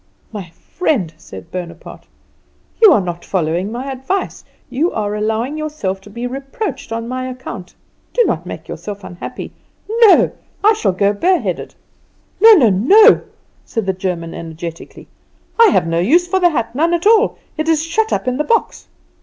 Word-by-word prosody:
"My 200 -6 -7
friend," 190 - -2
said 95 - -12
Bonaparte, 170 -2 -8 0.7
"you 435 -4 +9
are 295 - +5
not 175 -2 -5
following 180 +2 -1
my 255 +4 -5
advice; 265 +10 -3 0.2
you 290 +8 0
are 210 -1 -2
allowing 220 +7 -2
yourself 295 -12 -3
to 205 - -14
be 235 +4 -6
reproached 270 - -5
on 230 0 -3
my 255 +1 -4
account. 240 -7 -8 0.4
Do 485 - +3
not - - -1
make - - -8
yourself 205 -1 -7
unhappy. 175 -1 -8 0.3
No; 450 -1 +5 0.3
I 430 +2 +6
shall 430 - 0
go 200 +2 +2
bare 355 - +2
headed." 185 - -4 0.7
"No, 445 +1 +9
no, 255 - +5
no!" 395 - +6 0.5
cried 225 -3 -2
the 190 - 0
German 180 -3 -4
energetically. 165 0 -8 0.5
"I 460 - +8
have - - +2
no 165 0 0
use 325 - +3
for 380 +1 +1
the 355 -1 +4
hat, 235 -8 -2
none 330 +6 +2
at 340 - -4
all. 440 +1 +4 0.2
It 310 +1 -2
is 320 -1 +2
shut 435 +7 -1
up - - -1
in 255 0 0
the 300 - 0
box." 460 +8 -1
245 Hz, 170 wpm, -17 LUFS, -, 0.7 s, you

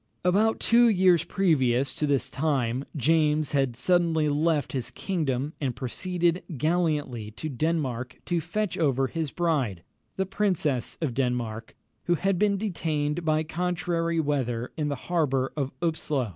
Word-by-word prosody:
About 210 +5 +3
two 235 0 +5
years 185 -5 +4
previous 135 -9 +2
to 150 - -1
this 135 -3 +1
time, 130 -3 -1
James 150 +1 +2
had 135 -4 +1
suddenly 165 +2 +2
left 150 -1 +1
his 125 -3 -3
kingdom, 145 -2 -2
and 130 -4 -1
proceeded 175 +7 -1 0.2
gallantly 150 -7 0
to 115 +9 -6
Denmark, 130 -4 -2
to 175 -2 0
fetch 200 +3 -2
over 135 -4 +2
his 160 +2 -3
bride, 135 - -1 0.3
the 190 - 0
Princess 180 - 0
of 150 -7 -1
Denmark, 120 -3 -2 0.3
who 175 - +3
had 190 +1 0
been 205 -1 +3
detained 165 -5 -1
by 155 -1 +2
contrary 170 0 -1
weather 130 -6 -1
in 150 -2 -1
the 145 - -1
harbour 140 -7 0
of 140 -3 -2
Upslo. 150 -7 -1
155 Hz, 145 wpm, -27 LUFS, 130-175 Hz, 0.3 s, two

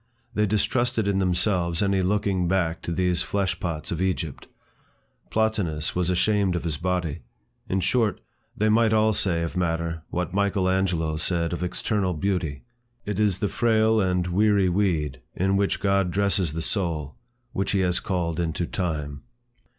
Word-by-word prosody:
They 105 0 +2
distrusted 115 +2 +1
in 100 -1 +1
themselves 90 -1 +1
any 100 -1 +2
looking 95 -1 +1
back 85 -3 0
to - - -4
these 90 0 +1
flesh 95 +1 -1
pots 80 -4 -4
of 85 +1 -2
Egypt. 90 -5 -2 0.8
Plotinus 100 -9 0
was 90 -1 0
ashamed 95 0 +2
of 85 - -2
his 80 -3 -2
body. 90 -3 -1 0.5
In 95 0 +1
short, 110 +3 +1 0.4
they 105 - +2
might 110 +1 +4
all 110 0 +3
say 85 -4 +1
of 85 - -4
matter, 85 -2 -1
what 90 0 -3
Michael 100 -1 +1
Angelo 90 -4 0
said 85 +1 0
of 85 - -4
external 90 +1 0
beauty, 85 -4 -2 0.4
"it 105 -1 -3
is 105 -4 +2
the 105 - 0
frail 110 0 +2
and 90 -2 +1
weary 100 +1 +3
weed, 85 -7 0
in 95 +2 +1
which 100 0 +1
God 100 -2 +2
dresses 95 -3 +1
the 80 0 -2
soul, 80 -9 -1 0.4
which 95 -2 -1
he 100 - +2
has 90 -1 +2
called 85 -3 -2
into 85 0 -1
time." 75 -6 -3
90 Hz, 160 wpm, -25 LUFS, 85-100 Hz, 0.8 s, might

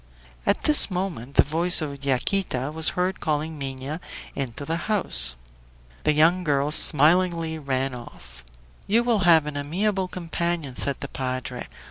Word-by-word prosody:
At - - +1
this 300 -7 +8
moment 175 - -5
the - - +6
voice 170 +4 +3
of 140 -3 -6
Yaquita 135 0 -2
was 160 0 +4
heard 185 +1 -1
calling 155 0 -3
Minha 135 +3 -6 0.3
into 135 0 -6
the 165 +6 -5
house. 65 - +3 0.7
The 150 - +3
young 165 +4 +2
girl 145 -2 0
smilingly 165 +2 +3
ran 135 -2 -3
off. 65 - -12 0.4
"You 230 +4 +2
will 235 -3 +1
have 160 -3 +5
an 150 -1 -6
amiable 190 +7 -2
companion," 170 -5 -4
said 140 +1 -2
the 140 - -4
padre. 130 -2 -6
155 Hz, 145 wpm, -23 LUFS, 135-175 Hz, 0.7 s, this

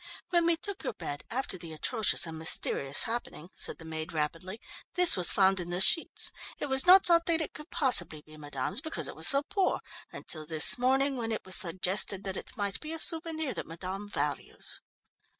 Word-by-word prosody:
"When 345 -1 0
we 335 -1 0
took 400 +3 -7
your - - -5
bed, 145 - -8
after 230 -6 -4
the 165 -2 -10
atrocious 215 +8 0
and 160 -1 -9
mysterious 140 -3 +2
happening," 190 -7 -7
said - - -1
the 165 - -15
maid 160 0 -8
rapidly, 165 +7 -6 0.4
"this 360 -1 +6
was 180 -2 +8
found 190 -1 +1
in 175 -1 -7
the 175 +1 -4
sheets. 330 - +1 0.3
It - - -6
was 265 +3 -2
not 375 +1 +6
thought 335 -1 +3
that 330 -1 0
it 315 - -6
could 300 +3 -13
possibly 175 - +3
be 155 - -17
madame's, 145 - -3
because 320 0 0
it - - -9
was - - +3
so 275 0 +6
poor, 385 +5 -3 0.3
until 155 -2 -7
this 160 +8 +7
morning 265 +2 -1
when 230 -2 -5
it 220 - -6
was 185 - -2
suggested 185 +2 -1
that 190 -1 -4
it - - -8
might 200 -2 -4
be 310 +1 -8
a - - -6
souvenir 320 -3 0
that - - -8
madame 190 +5 -9
values." - - -5
205 Hz, 205 wpm, -27 LUFS, -, 0.4 s, was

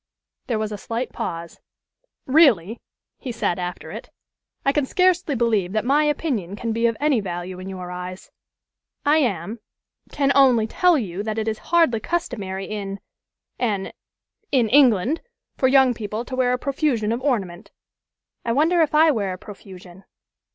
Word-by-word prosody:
There 235 - 0
was 215 0 -2
a 205 - -5
slight 230 +5 -4
pause. 170 -1 -5 0.7
"Really," 240 - +4 0.4
he 260 - -5
said, 205 -6 -1
after 180 -3 -5
it, 220 +4 -8 0.6
"I 275 - +4
can 285 -1 0
scarcely 365 -4 +2
believe 220 -6 +1
that 215 +1 0
my 290 +4 +3
opinion 260 - -1
can 230 +2 -3
be 230 +1 +2
of 230 -1 -1
any 290 -4 +2
value 180 -1 -5
in 185 +1 -7
your 180 -2 -7
eyes. 180 +1 -7 0.7
I 295 +2 +4
am 210 - -1 0.5
can 275 -1 +1
only 255 -5 +5
tell 355 +8 +3
you 195 -7 -3
that 215 +1 -3
it 220 0 -2
is 220 -1 -2
hardly 330 -10 +3
customary 205 - -3
in 200 -1 -5 0.6
an 205 -6 -1 0.6
in 245 -5 +3
England 260 - +4 0.3
for 260 - +2
young 265 -1 +5
people 220 +1 -5
to 255 - -5
wear 255 -1 +2
a 250 - +1
profusion 260 -5 0
of 235 +2 -2
ornament." 200 -11 -2 0.7
"I 230 - 0
wonder 325 +6 +3
if 305 -1 +1
I 315 +1 +6
wear 200 -8 -1
a - - -7
profusion." 190 -2 -13
230 Hz, 165 wpm, -22 LUFS, 195-275 Hz, 0.7 s, I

